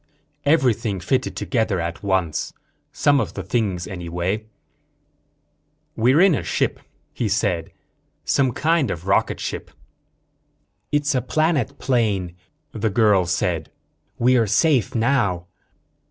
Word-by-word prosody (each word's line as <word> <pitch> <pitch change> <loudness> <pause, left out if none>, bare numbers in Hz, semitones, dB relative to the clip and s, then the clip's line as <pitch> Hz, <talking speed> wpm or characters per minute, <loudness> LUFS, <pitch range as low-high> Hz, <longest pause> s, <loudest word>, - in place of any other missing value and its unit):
Everything 125 - +2
fitted 125 +9 -1
together 110 -7 0
at 85 +1 -4
once. 95 -6 -1 0.4
Some 145 -1 +3
of - - -3
the - - -4
things, 100 -7 -1
anyway. 90 +3 -3 1.5
"We're 130 +8 +4
in 190 -2 +6
a 135 - 0
ship," - - -1 0.3
he 115 - -2
said. 95 -5 0 0.5
"Some 135 -3 +2
kind 160 +3 +1
of 85 +1 -5
rocket 95 - +1
ship." - - -5 1.2
"It's 145 0 +1
a 130 - +1
planet 155 -1 0
plane," 105 -9 0 0.4
the 110 0 -1
girl 100 -4 +3
said. 85 -2 -1 0.5
"We're 120 -2 +3
safe 135 - +2
now." 110 -8 +1
110 Hz, 115 wpm, -22 LUFS, 90-130 Hz, 1.5 s, in